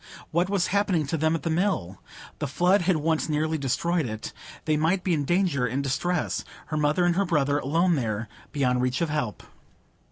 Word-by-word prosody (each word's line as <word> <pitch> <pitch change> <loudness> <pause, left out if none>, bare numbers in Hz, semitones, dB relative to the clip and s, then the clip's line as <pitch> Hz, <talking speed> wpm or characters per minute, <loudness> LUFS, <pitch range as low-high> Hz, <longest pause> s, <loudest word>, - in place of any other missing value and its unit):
What 175 +3 +1
was 195 -3 +1
happening 195 -6 +2
to 140 - -2
them 160 +1 +1
at 165 - -4
the 165 - -1
Mill? 160 - -1 0.4
The - - -1
flood 180 +8 +3
had 180 +1 +2
once 160 +1 0
nearly 155 +1 0
destroyed 155 +3 0
it. 110 -1 -6 0.3
They 155 -1 +2
might 165 +5 +1
be 180 - +1
in 145 -3 0
danger, 175 -7 +1
in 135 +3 -2
distress,—her 155 +2 -2
mother 150 +4 +2
and 175 -1 +2
her 200 +2 +2
brother, 145 -4 +1
alone 165 +6 +2
there, 110 -6 -1 0.2
beyond 125 -4 +1
reach 125 +2 0
of 165 -3 0
help! 135 -9 -2
155 Hz, 190 wpm, -26 LUFS, 140-175 Hz, 0.4 s, flood